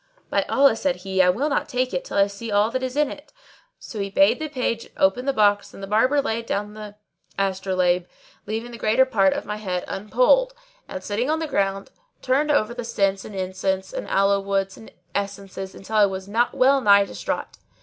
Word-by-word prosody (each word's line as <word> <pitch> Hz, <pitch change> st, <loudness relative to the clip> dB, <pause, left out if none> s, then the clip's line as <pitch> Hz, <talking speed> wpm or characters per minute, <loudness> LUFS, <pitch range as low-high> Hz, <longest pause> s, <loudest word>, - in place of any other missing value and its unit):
"By -, -, +2 dB
Allah," 275 Hz, -4 st, +4 dB
said 275 Hz, +3 st, 0 dB
he, 190 Hz, -1 st, +2 dB
"I 180 Hz, -, +5 dB
will 240 Hz, +11 st, +1 dB
not 285 Hz, -, -1 dB
take 255 Hz, -1 st, -1 dB
it 180 Hz, -, -1 dB
till -, -, -5 dB
I 200 Hz, -, +6 dB
see 200 Hz, +3 st, -7 dB
all 205 Hz, +2 st, +2 dB
that 260 Hz, +1 st, -2 dB
is 260 Hz, 0 st, -4 dB
in 300 Hz, -2 st, +2 dB
it." -, -, -11 dB, 0.5 s
So 220 Hz, -, -8 dB
I 200 Hz, 0 st, -2 dB
bade 290 Hz, +9 st, +3 dB
the 310 Hz, 0 st, -4 dB
page 250 Hz, -5 st, -2 dB
open 195 Hz, +7 st, +2 dB
the 275 Hz, -, +2 dB
box 205 Hz, -4 st, +2 dB
and 195 Hz, -, -10 dB
the -, -, -2 dB
Barber 255 Hz, +8 st, +2 dB
laid 230 Hz, -2 st, -3 dB
down 210 Hz, +1 st, -2 dB
the 210 Hz, -1 st, -9 dB, 0.4 s
astrolabe, 185 Hz, -2 st, 0 dB, 0.4 s
leaving 225 Hz, +3 st, -4 dB
the 235 Hz, -, -9 dB
greater 225 Hz, +5 st, +3 dB
part 195 Hz, -7 st, +3 dB
of -, -, -5 dB
my 210 Hz, 0 st, -4 dB
head 185 Hz, -4 st, -3 dB
unpolled; -, -, +2 dB, 0.3 s
and, 185 Hz, -, -7 dB
sitting 225 Hz, +6 st, -2 dB
on 315 Hz, -, +2 dB
the 320 Hz, -, -2 dB
ground, 195 Hz, -8 st, -1 dB, 0.3 s
turned 275 Hz, +4 st, +1 dB
over 240 Hz, -6 st, +2 dB
the 245 Hz, 0 st, -5 dB
scents 195 Hz, -4 st, 0 dB
and 210 Hz, -, -9 dB
incense 190 Hz, 0 st, -2 dB
and -, -, -5 dB
aloes 195 Hz, 0 st, +2 dB
wood 195 Hz, 0 st, 0 dB
and 220 Hz, -, -14 dB, 0.2 s
essences 195 Hz, -1 st, -5 dB
till 215 Hz, +3 st, -6 dB
I 210 Hz, -1 st, +6 dB
was 190 Hz, 0 st, -6 dB, 0.2 s
well 270 Hz, +1 st, +3 dB
nigh 200 Hz, -3 st, +6 dB
distraught. -, -, -5 dB
210 Hz, 210 wpm, -23 LUFS, 195-255 Hz, 0.5 s, I